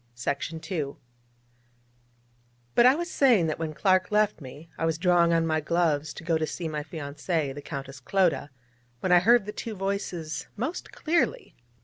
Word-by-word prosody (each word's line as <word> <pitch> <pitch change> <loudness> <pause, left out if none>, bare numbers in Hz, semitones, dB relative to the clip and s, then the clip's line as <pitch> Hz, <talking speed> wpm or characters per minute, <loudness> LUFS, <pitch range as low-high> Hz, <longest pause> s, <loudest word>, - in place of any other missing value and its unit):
But 240 - +6
I 260 - +6
was 345 +2 -3
saying 250 - +4
that 155 0 -2
when 155 -2 -4
Clark 185 0 +2
left 210 -3 +2
me, 145 +4 -10
I - - -5
was 165 -1 +1
drawing 175 -1 +4
on 165 -1 +3
my 155 -1 +1
gloves 155 -2 +1
to - - -9
go 165 -1 +1
to 155 - -1
see 170 +1 -4
my 155 -1 -3
fiancée, 150 0 -3
the 145 - -8
Countess 135 -1 -7
Clodagh, 160 -1 +1 0.5
when 185 - 0
I 180 - +8
heard 230 +2 +4
the 210 - -4
two 220 +1 -6
voices 190 -5 -3
most 260 - -4
clearly. 345 +9 0
170 Hz, 160 wpm, -27 LUFS, 155-200 Hz, 0.5 s, I